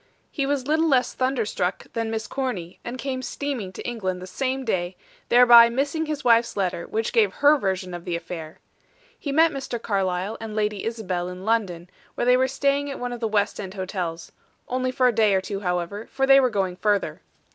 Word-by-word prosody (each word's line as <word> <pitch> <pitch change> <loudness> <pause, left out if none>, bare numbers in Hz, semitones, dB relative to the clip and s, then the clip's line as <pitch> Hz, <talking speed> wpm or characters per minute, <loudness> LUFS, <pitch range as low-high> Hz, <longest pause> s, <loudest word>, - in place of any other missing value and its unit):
He 275 -3 -1
was 280 -2 -1
little 315 +3 +2
less 260 -4 +2
thunderstruck 230 -8 -1
than 230 -1 -2
Miss 220 -1 -3
Corny, 210 -9 -4
and 240 +2 -5
came 260 -1 -3
steaming 255 -7 -4
to - - -7
England 190 -7 -3
the 180 - -8
same 265 +6 -2
day, 180 -4 -1 0.3
thereby 240 -1 +8
missing 280 +6 -1
his 305 -2 -3
wife's 235 -2 +3
letter, 180 -3 -1
which 220 0 -2
gave 215 -5 +3
her 290 +1 +5
version 190 -7 -2
of 175 -1 -6
the 175 - -3
affair. 165 -2 -7 0.6
He 285 - -4
met 325 +3 +4
Mr. 265 -4 -4
Carlyle 195 -1 -1
and 220 -1 -6
Lady 210 -2 -1
Isabel 185 -6 -3
in 180 +1 -8
London, 195 -7 0 0.3
where - - -1
they 250 0 +5
were 260 +1 +3
staying 280 +1 0
at 275 - -5
one 245 0 -4
of 240 - -6
the 225 - -1
west 210 -1 0
end 190 -1 -6
hotels 180 -4 -4 0.4
only 255 0 -1
for 255 0 +3
a 245 - +2
day 215 -3 +3
or 190 - +2
two, 195 +1 -4
however, 180 +3 -3
for 270 0 0
they 270 0 +7
were 255 -2 +3
going 190 -4 -1
further. 205 0 0
225 Hz, 205 wpm, -24 LUFS, 185-260 Hz, 0.6 s, thereby